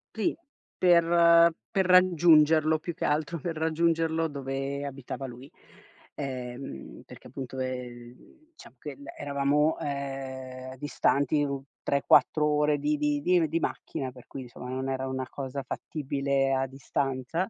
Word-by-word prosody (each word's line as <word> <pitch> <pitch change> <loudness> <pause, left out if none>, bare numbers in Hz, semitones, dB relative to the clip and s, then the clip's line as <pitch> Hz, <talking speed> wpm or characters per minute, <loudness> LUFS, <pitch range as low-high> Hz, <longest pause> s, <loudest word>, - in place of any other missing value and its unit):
Sì, 220 - 0 0.4
per 170 -1 +6 0.2
per 190 -3 +2
raggiungerlo 160 -4 +5
più 170 +2 -5
che - - -7
altro, 150 +2 0
per 165 +2 -4
raggiungerlo 165 0 +1
dove 140 0 -4
abitava 135 0 -6
lui. 130 +2 -10 0.6
Ehm, 125 - -6
perché - - -13
appunto, 130 0 -7
ehm, 125 -2 -5 0.4
diciamo 315 - -16
che - - -7
l 285 - -15
eravamo, 145 +2 +1
ehm, 130 -2 -5
distanti 145 +1 +1
un 140 -1 -3 0.2
3-4 145 +2 +3
ore 150 0 +2
di 150 +1 0
di 145 0 0
di 180 0 +4
m 160 - +2
di 165 +2 -1
macchina, 130 -2 -4
per 125 -1 -15
cui 135 - -7
insomma, 125 +1 -9
non 130 +1 -3
era 130 0 -2
una 130 0 -3
cosa 135 0 -5
fattibile 140 -2 -1
a 135 0 +1
distanza; 135 - -2
140 Hz, 140 wpm, -28 LUFS, 130-160 Hz, 0.6 s, per